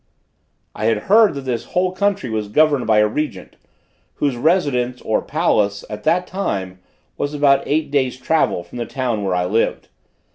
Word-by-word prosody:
I 110 - -4
had 110 -2 +1
heard 220 -6 +6
that 140 - -4
this 125 -3 -3
whole 185 0 +2
country 200 -5 -1
was 110 -2 -3
governed 145 +2 +2
by 110 -1 +4
a 105 0 +5
Regent, 105 -6 -4 0.6
whose 140 -3 0
residence, 125 -4 +1
or 110 - 0
palace, 105 - 0
at 105 0 -6
that 180 +1 +2
time, 95 - -4 0.4
was 145 +1 -2
about 140 -2 +4
eight 150 -1 0
days' 130 -3 0
travel 130 - 0
from 85 +8 -10
the 120 - -3
town 120 -6 -2
where 95 -2 0
I 90 0 0
lived. 110 +5 -1
130 Hz, 175 wpm, -19 LUFS, 105-155 Hz, 0.6 s, heard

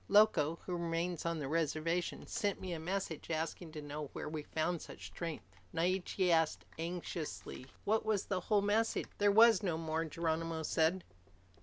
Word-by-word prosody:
Loco, 195 -7 +5
who 180 - -2
remains 170 0 -1
on 170 0 0
the 145 -3 -3
reservation, 165 +2 0
sent 205 -2 -1
me 185 -2 -4
a 165 - -3
messenger, 170 -2 -3
asking 160 +1 -3
to 150 -2 -6
know 145 0 -5
where - - -4
we 155 0 -3
found 160 +3 -1
such - - -9
strength." 140 - -6 0.2
Naiche 185 +2 +1
asked 160 -2 +2
anxiously, 165 -5 -4 0.2
"Was 220 -1 +2
that - - -20
the 190 -3 +1
whole 205 +2 +2
message?" 220 +3 +2
"There 205 0 +5
was 225 -1 +7
no 175 -5 0
more," 160 0 -1
Geronimo 165 0 -1
said. 165 +4 +2
165 Hz, 165 wpm, -35 LUFS, 160-190 Hz, 0.2 s, was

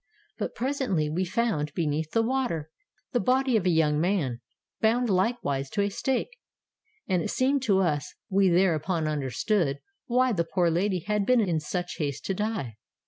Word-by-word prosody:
But - - -3
presently 245 - -1
we 180 +4 0
found, 175 -7 -1
beneath 155 -2 -1
the 225 +7 +2
water, 225 - -1 0.4
the 245 - +1
body 255 +3 +2
of 195 -4 +2
a - - +5
young 155 -3 +3
man, 160 -10 0 0.4
bound 230 +1 +2
likewise 180 - 0
to 205 - 0
a 200 - -1
stake; 265 - -2 0.7
and 185 -3 +1
it - - -3
seemed 270 +2 +1
to 195 -4 +3
us 150 -5 -1
we 195 -2 +3
thereupon 170 -2 +2
understood 150 - 0 0.3
why 255 +1 +3
the 175 -6 +1
poor 170 0 +1
lady 180 +2 0
had 210 +3 0
been 255 -1 +5
in 175 -6 +1
such 175 +3 -4
haste 145 -3 -3
to 195 - 0
die. 190 - -3
185 Hz, 170 wpm, -27 LUFS, 155-225 Hz, 0.7 s, a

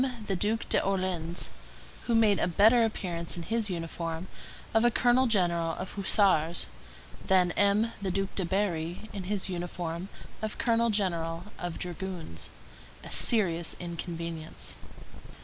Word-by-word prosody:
the 195 - -1
Duc 215 +5 +1
d'Orléans, 185 -3 0 0.6
who 235 - +2
made 215 -3 +4
a - - +2
better 220 +7 +5
appearance 175 -7 -2
in 170 - -4
his 225 +3 -1
uniform 165 0 -4 0.5
of 225 +1 +4
a 240 - +6
colonel 245 +2 +3
general 170 -6 +2
of 190 - -5
hussars 190 -5 +2 0.6
than 185 -2 +4
M. 205 +4 +3
the 195 - -1
Duc 195 +1 -1
de 195 - -2
Berri, 180 +1 -2
in 195 -3 -5
his 200 0 -1
uniform 175 0 -4 0.3
of 215 -1 -3
colonel 235 0 +2
general 170 -5 0 0.2
of 175 -1 -4
dragoons—a 170 - -8
serious 175 -7 +3
inconvenience. 170 -2 -5
185 Hz, 130 wpm, -29 LUFS, 170-210 Hz, 0.6 s, a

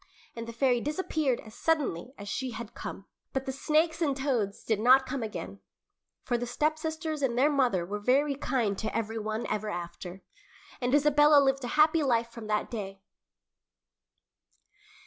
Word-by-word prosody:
And 230 0 -6
the - - -5
fairy 245 0 +2
disappeared 300 -3 -1
as 215 - -13
suddenly 265 - -1
as 205 - -9
she 260 +5 -2
had 230 0 -7
come. 195 - -7 0.3
But 265 0 -2
the 265 - -2
snakes 315 +4 +1
and 280 -4 +1
toads 245 -8 -1
did 220 -2 0
not 260 +4 +6
come 270 -1 -3
again, 100 - -6 0.6
for 240 - 0
the 245 - -3
stepsisters 310 +3 -2
and 245 -3 0
their 285 +4 +4
mother 245 -11 +2
were 205 +3 -4
very 275 +7 +2
kind 245 -7 -1
to 220 0 -2
every 225 0 -2
one 215 +2 -3
ever 215 0 -2
after, 175 0 -7 0.6
and 250 +2 +2
Isabella 295 0 +6
lived 270 -1 +2
a - - -2
happy 310 +1 +5
life 235 -4 +1
from 230 -2 -9
that 210 0 -1
day. 195 -4 -6
245 Hz, 165 wpm, -29 LUFS, 215-290 Hz, 0.6 s, not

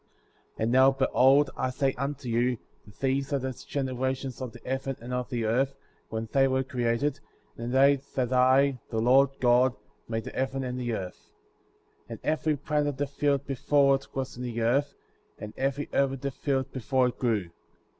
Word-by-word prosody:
4. - - -2
And 115 - +1
now, 130 +1 +6
behold, 135 +1 +4
I 130 - -1
say 135 +1 0
unto 140 0 -4
you, 120 +1 +1 0.3
that 105 - -17
these 135 +1 0
are 140 - +2
the 130 0 -3
generations 130 0 -3
of 130 -2 -4
the - - -12
heaven 135 +1 -2
and 125 +2 -7
of 125 -1 -2
the 120 -4 -2
earth, 130 +5 +1 0.3
when 110 0 -4
they 135 -1 +4
were 130 0 +1
created, 130 +3 -1 0.4
in 115 +1 -5
the 130 - +1
day 140 0 +5
that 130 -1 0
I, 130 +1 +4
the 110 - -3
Lord 130 +4 +5
God, 125 +1 +4 0.3
made 115 -1 -2
the - - -7
heaven 135 0 -2
and 125 0 -4
the 120 -1 -2
earth. 90 -3 -8 0.8
5. - - -32
And - - -7
every 155 -1 0
plant 150 +1 0
of 145 -2 -3
the 145 - 0
field 140 0 0
before 140 +1 +3
it 135 - -2
was 135 0 -3
in - - -7
the 120 -2 -3
earth, 140 +5 +1 0.4
and 105 0 -8
every 135 +2 -1
herb 140 -1 +2
of 135 - -7
the 140 - -2
field 135 0 -2
before 130 0 +1
it 120 - -10
grew. 105 -8 0
130 Hz, 200 wpm, -28 LUFS, 125-140 Hz, 0.8 s, now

